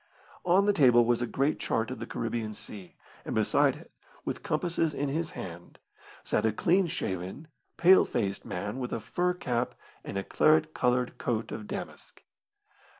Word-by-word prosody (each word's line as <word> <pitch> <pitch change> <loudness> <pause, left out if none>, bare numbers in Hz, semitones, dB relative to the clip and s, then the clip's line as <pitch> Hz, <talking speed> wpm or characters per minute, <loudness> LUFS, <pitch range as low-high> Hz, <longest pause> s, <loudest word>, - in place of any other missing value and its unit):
On 185 +3 +4
the 205 - +4
table 125 -8 +6
was 120 0 +2
a 120 - 0
great 140 +5 0
chart 115 +2 -1
of 130 - -6
the 115 - -6
Caribbean 115 -2 -3
Sea, 95 -4 -10 0.3
and - - -4
beside - - +3
it, - - -14 0.3
with - - -3
compasses 165 -3 0
in 145 0 -1
his 160 +3 -1
hand, 85 -1 -8 0.5
sat - - 0
a 110 - +3
clean 180 - +2
shaven, 95 - -4 0.3
pale 185 +2 +7
faced 100 -5 -2
man 105 +7 -4
with 125 -1 -4
a - - -1
fur 180 +10 -1
cap 125 -6 -2 0.3
and - - -5
a 95 - -1
claret 155 +5 +3
coloured 125 0 0
coat 115 -2 -2
of 110 -1 -6
damask. - - -8
125 Hz, 170 wpm, -29 LUFS, 110-160 Hz, 0.5 s, pale